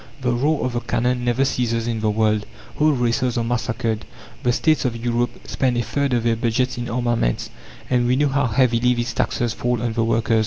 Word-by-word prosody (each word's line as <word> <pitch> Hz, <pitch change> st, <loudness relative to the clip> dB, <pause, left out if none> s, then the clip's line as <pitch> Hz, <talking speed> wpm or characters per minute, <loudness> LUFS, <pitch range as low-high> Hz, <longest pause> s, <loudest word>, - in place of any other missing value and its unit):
The 125 Hz, -1 st, +1 dB
roar 140 Hz, +5 st, +1 dB
of 125 Hz, -, -2 dB
the 120 Hz, -, 0 dB
cannon 125 Hz, +1 st, -1 dB
never 120 Hz, +2 st, +2 dB
ceases 115 Hz, -3 st, 0 dB
in 115 Hz, -2 st, -1 dB
the 110 Hz, 0 st, +1 dB
world, 105 Hz, -1 st, +1 dB, 0.3 s
whole 155 Hz, +1 st, +4 dB
races 120 Hz, -1 st, 0 dB
are 120 Hz, -, +1 dB
massacred, 115 Hz, -2 st, -1 dB, 0.4 s
the 125 Hz, -, +2 dB
states 155 Hz, +4 st, +2 dB
of 125 Hz, -3 st, -1 dB
Europe 120 Hz, +1 st, -2 dB
spend 125 Hz, -2 st, 0 dB
a 120 Hz, -, +1 dB
third 135 Hz, +4 st, -1 dB
of 120 Hz, -2 st, +1 dB
their 115 Hz, -1 st, +2 dB
budgets 120 Hz, +3 st, 0 dB
in 120 Hz, 0 st, -4 dB
armaments; 120 Hz, -, 0 dB, 0.4 s
and 125 Hz, -1 st, +2 dB
we 125 Hz, -, +3 dB
know 145 Hz, +2 st, +2 dB
how 140 Hz, -1 st, +1 dB
heavily 125 Hz, 0 st, +2 dB
these 120 Hz, -1 st, -2 dB
taxes 120 Hz, 0 st, 0 dB
fall 120 Hz, -1 st, -1 dB
on 120 Hz, 0 st, -2 dB
the 115 Hz, 0 st, +1 dB
workers. 115 Hz, 0 st, +2 dB
120 Hz, 210 wpm, -21 LUFS, 115-125 Hz, 0.4 s, whole